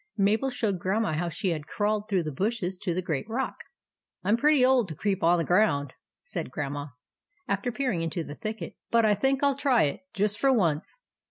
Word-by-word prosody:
Mabel 215 +6 +2
showed 210 -7 -1
Grandma 195 +1 0
how 170 +3 -1
she 190 +3 -2
had 155 -3 -3
crawled 210 +1 -1
through 190 -4 +1
the 155 - -3
bushes 190 - -2
to 200 -3 -2
the 185 - -1
great 160 +3 -3
rock. 255 +3 -2 0.3
" - - -57
I 190 - -2
'm 215 - +5
pretty 290 0 +4
old 255 -4 +4
to 160 - -6
creep 195 +3 -1
on 175 +2 +4
the 165 - +1
ground," 160 -7 +2 0.3
said - - -4
Grandma, 145 +2 -4 0.6
after 200 +5 -1
peering 245 -9 -1
into 165 +1 -2
the 145 - -8
thicket; 215 +7 -6
" - - -64
but 230 -1 +4
I 210 - +5
think 270 +5 +1
I 285 - +6
'11 275 0 -3
try 255 -5 +4
it, 145 - -1
just 210 +1 0
for 275 - +4
once." 180 - 0
205 Hz, 225 wpm, -27 LUFS, 170-230 Hz, 0.6 s, I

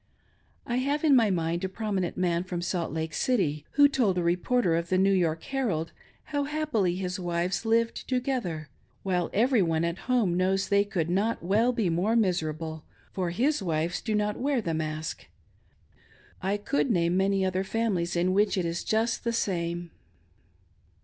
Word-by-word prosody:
I 240 - -1
have 280 +4 0
in 295 -4 +5
my 230 -4 +4
mind 170 -1 -1
a 190 - -1
prominent 195 -3 -2
man 175 -1 +1
from 180 -2 -4
Salt 175 -2 -2
Lake 160 +1 -3
City, 155 - 0
who 285 0 +7
told 240 -10 +1
a 175 - +1
reporter 180 +2 +1
of 170 0 -2
the 185 - +2
New 195 +1 +4
York 165 -4 +1
Herald 220 - -2 0.4
how 285 -1 +1
happily 285 - 0
his 185 0 -3
own 180 - -6
wives 175 +4 -1
lived 230 +1 +1
together, 245 - -2 0.4
while 180 -3 0
every 235 +2 +3
one 165 -2 +1
at 170 +2 -3
home 225 -9 +2
knows 190 +1 +1
that - - -7
they 200 0 +4
could 175 -5 -2
not 200 +5 0
well 215 +7 +3
be 230 -6 0
more 190 +7 +1
miserable, 160 -6 -1 0.3
for 185 -2 -2
his 250 - +1
wives 165 -1 -1
do 220 -2 -1
not 210 0 0
wear 275 0 +1
the 170 -7 -2
mask. 155 0 -4 1.1
I 195 +2 0
could 270 +6 0
name 175 -4 +2
many 195 0 +2
other 185 0 0
families 195 -5 -1
in 180 +2 +2
which 205 +1 +2
it 180 - 0
is 170 +1 -2
just 225 +2 0
the 235 - 0
same. 175 -5 -2
190 Hz, 180 wpm, -27 LUFS, 170-230 Hz, 1.1 s, who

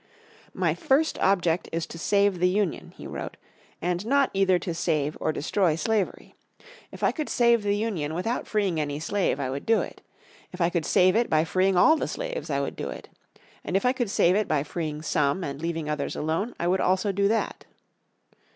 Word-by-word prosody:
"My - - +1
first 315 -1 +1
object 180 -3 +1
is 165 0 -2
to 165 - -10
save 200 0 +2
the 180 - +4
Union," 195 -2 -1
he - - -10
wrote, - - -6 0.5
"and 175 +1 -1
not 275 +4 +2
either 190 -2 +3
to 175 0 -4
save 155 -3 -1
or - - +1
destroy 165 +2 +1
slavery. 210 +3 -2 0.6
If - - -10
I - - +4
could 305 -3 -4
save 235 -1 +3
the 205 0 +1
Union 185 -9 -2
without 225 +8 -2
freeing 200 -6 0
any 145 -1 -2
slaves 185 -2 0
I 130 -2 -2
would 140 +1 -4
do 225 0 +3
it. - - -8 0.5
If 180 - -10
I 170 0 +2
could 170 -4 -1
save 185 -1 +4
it 235 +1 +2
by 155 0 +3
freeing 185 +2 +1
all 315 - +6
the - - -2
slaves - - -5
I - - 0
would - - -4
do - - -4
it. - - -9 0.5
And 185 - 0
if 200 - -2
I 250 - +4
could 245 -5 -2
save 180 -2 +3
it 215 -1 +1
by 150 -3 +1
freeing 155 -1 -4
some, 150 +3 +1
and 140 -1 -5
leaving 165 -2 -3
others 150 -2 -2
alone 165 +10 -2
I 170 - 0
would 185 +2 +2
also 190 +2 +2
do 200 +1 +1
that." 225 +2 -1
185 Hz, 205 wpm, -26 LUFS, 160-210 Hz, 0.6 s, all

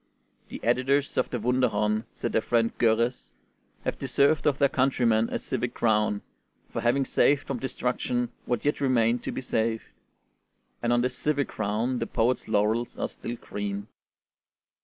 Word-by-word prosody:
"The - - -7
editors 135 +4 +2
of - - +1
the 125 - -2
'Wunderhorn,'" 110 -3 +1
said 120 - -4
their 110 - +2
friend 115 0 +1
Görres, 115 +2 +1 0.5
"have - - -2
deserved 145 +3 +2
of 140 -2 +2
their 140 - +4
countrymen 120 -4 +2
a - - 0
civic - - -3
crown, 105 -2 +1 0.5
for - - -2
having 130 +3 +2
saved 145 +1 +3
from 135 -3 -3
destruction 125 -1 -1 0.2
what 120 0 -2
yet 145 0 +1
remained 120 -3 +2
to - - -4
be - - -4
saved;" 115 -2 -1 1.0
and 120 - +1
on 120 0 +3
this 125 0 -1
civic 145 -2 0
crown 110 +4 -1
the 115 - -2
poets' 120 +3 0
laurels 110 +3 +1
are - - -2
still 120 - -6
green. 100 -2 -5
120 Hz, 160 wpm, -27 LUFS, 110-130 Hz, 1.0 s, their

